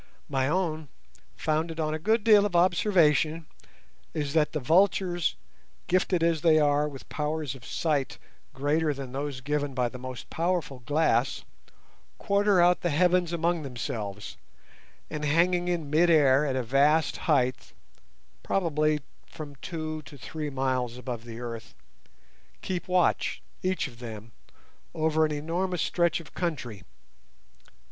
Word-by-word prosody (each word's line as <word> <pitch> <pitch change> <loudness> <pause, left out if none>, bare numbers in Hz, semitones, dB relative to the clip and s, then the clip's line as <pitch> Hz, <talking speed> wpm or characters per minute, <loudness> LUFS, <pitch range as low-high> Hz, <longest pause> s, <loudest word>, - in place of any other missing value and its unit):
My 135 -2 +1
own, 160 -2 -1 0.5
founded 160 +1 -1
on 155 -1 0
a 155 - -3
good 220 +6 +1
deal 210 -2 +6
of 205 -4 -1
observation, 170 - +3 0.7
is 145 -2 -2
that 155 -2 +2
the 155 - -2
vultures, 175 +3 +2 0.5
gifted 180 -1 +1
as 165 -2 +2
they 160 -2 +5
are 145 0 +3
with 135 -2 -11
powers 150 -2 -3
of 130 -3 -13
sight 145 -2 -1 0.3
greater 150 +2 0
than 135 -2 -7
those 140 -1 -4
given 145 0 -2
by 125 -1 +1
the 125 - -9
most 130 -1 -7
powerful 170 -5 -1
glass, 135 -2 +1 0.7
quarter 200 -1 +2
out 175 +1 +4
the 175 - 0
heavens 175 +2 +2
among 170 0 0
themselves, 110 -6 -5 0.7
and 150 0 -4
hanging 175 +4 +2
in 165 -5 -2
mid 170 +3 +4
air 145 -3 +5
at 135 - -1
a 130 - 0
vast 140 +5 +3
height—probably 150 +3 -1 0.3
from 155 -3 -9
two 155 0 -5
to 145 0 -13
three 150 +2 -5
miles 130 -3 -1
above 125 -2 -6
the 115 -1 -8
earth—keep 120 +8 -9
watch, 180 -1 +1 0.2
each 185 -3 0
of 120 -3 -14
them, 115 -2 -8 0.6
over 160 0 +2
an - - -6
enormous 170 +4 -1
stretch 170 -1 +1
of 165 - -13
country. 125 - -3
155 Hz, 135 wpm, -27 LUFS, 135-170 Hz, 0.7 s, deal